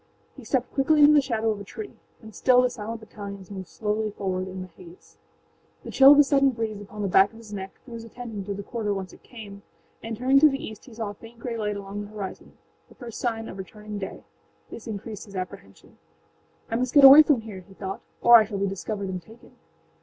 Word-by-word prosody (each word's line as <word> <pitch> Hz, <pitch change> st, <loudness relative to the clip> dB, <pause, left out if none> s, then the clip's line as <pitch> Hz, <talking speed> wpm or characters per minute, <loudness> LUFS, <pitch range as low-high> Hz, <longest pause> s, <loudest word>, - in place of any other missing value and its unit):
He 270 Hz, -, -12 dB
stepped 255 Hz, +1 st, -1 dB
quickly 295 Hz, +3 st, +3 dB
into 295 Hz, +1 st, +8 dB
the 295 Hz, -, +6 dB
shadow 225 Hz, -4 st, -1 dB
of 210 Hz, -, -4 dB
a -, -, -7 dB
tree. 410 Hz, -, -9 dB, 0.3 s
And 220 Hz, 0 st, -12 dB
still 250 Hz, +2 st, +4 dB
the 250 Hz, -, +1 dB
silent 225 Hz, -1 st, -6 dB
battalions 200 Hz, -3 st, -9 dB
moved 190 Hz, -2 st, -7 dB
slowly 210 Hz, +6 st, -2 dB
forward 190 Hz, -2 st, -3 dB
in 185 Hz, 0 st, -6 dB
the -, -, -10 dB
haze. 175 Hz, 0 st, -17 dB, 0.6 s
The -, -, -8 dB
chill 275 Hz, +1 st, +8 dB
of -, -, +3 dB
a 295 Hz, -, +8 dB
sudden 275 Hz, -1 st, +3 dB
breeze 225 Hz, -4 st, -4 dB
upon 205 Hz, +1 st, -7 dB
the -, -, 0 dB
back 195 Hz, +2 st, +4 dB
of -, -, -14 dB
his 220 Hz, -2 st, -12 dB
neck 190 Hz, -1 st, -7 dB
drew 240 Hz, -, -11 dB
his 230 Hz, -1 st, -7 dB
attention 230 Hz, -3 st, -7 dB
to 200 Hz, 0 st, -4 dB
the 200 Hz, -, -6 dB
quarter 210 Hz, -2 st, -3 dB
whence 190 Hz, -1 st, -6 dB
it -, -, -17 dB
came, 205 Hz, -4 st, -11 dB, 0.4 s
and 225 Hz, -1 st, -6 dB
turning 265 Hz, +3 st, +4 dB
to 305 Hz, +1 st, +7 dB
the 275 Hz, -, -2 dB
east 220 Hz, -6 st, -9 dB
he 255 Hz, -, -14 dB
saw 220 Hz, -2 st, -4 dB
a -, -, -10 dB
faint 225 Hz, +3 st, -15 dB
gray 235 Hz, 0 st, -5 dB
light 210 Hz, -2 st, -2 dB
along 200 Hz, +1 st, -6 dB
the -, -, -12 dB
horizonâthe 200 Hz, -3 st, -11 dB
first 235 Hz, -4 st, -8 dB
sign 225 Hz, -2 st, -2 dB
of 190 Hz, -, -9 dB
returning 210 Hz, +2 st, -8 dB
day. 190 Hz, -, -7 dB, 0.5 s
This 230 Hz, -, -10 dB
increased 215 Hz, -1 st, -7 dB
his 200 Hz, -2 st, -13 dB
apprehension. 180 Hz, -, -9 dB, 0.7 s
âI 230 Hz, -, 0 dB
must 255 Hz, +3 st, -2 dB
get 285 Hz, -, +7 dB
away 275 Hz, +3 st, +12 dB
from 295 Hz, -6 st, +2 dB
here,â 205 Hz, -4 st, -9 dB
he 195 Hz, -, -17 dB
thought, 195 Hz, 0 st, -6 dB, 0.2 s
âor 235 Hz, 0 st, +9 dB
I 215 Hz, -, +2 dB
shall 205 Hz, -1 st, -5 dB
be 200 Hz, -, 0 dB
discovered 195 Hz, +1 st, -4 dB
and 185 Hz, -1 st, -4 dB
taken. 225 Hz, +7 st, -17 dB
215 Hz, 235 wpm, -25 LUFS, 200-240 Hz, 0.7 s, away